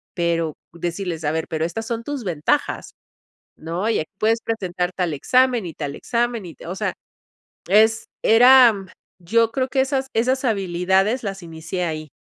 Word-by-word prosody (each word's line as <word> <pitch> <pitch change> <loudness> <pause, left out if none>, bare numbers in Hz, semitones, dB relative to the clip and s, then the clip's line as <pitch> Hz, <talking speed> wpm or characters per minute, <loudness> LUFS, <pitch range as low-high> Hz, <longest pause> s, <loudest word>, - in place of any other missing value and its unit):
pero 170 -3 0 0.2
decirles 170 0 -4
a 150 - +1
ver, 160 +1 -2
pero 160 -1 -1
estas 220 +7 -5
son 230 0 -3
tus 285 -1 -5
ventajas, 165 -6 -1 0.7
¿no? 170 +6 -3
Y 230 - +1
aquí 155 - -6
puedes 225 +1 +2
presentar 180 -5 -2
tal 175 -4 -1
examen 250 - +2
y 165 - -6
tal 145 -2 -5
examen 240 -3 -1
y 165 - -10
te - - -13
o 175 - -4
sea, - - -1 0.8
es, 220 +3 +4 0.2
era, 235 -4 +6 0.3
yo 225 +6 +2
creo 260 0 -1
que 265 - 0
esas 265 0 0
esas 255 +4 +1
habilidades 195 +1 +1
las 195 -2 -5
inicié 165 +2 -5
ahí. 155 -2 -4
195 Hz, 165 wpm, -22 LUFS, 170-230 Hz, 0.8 s, era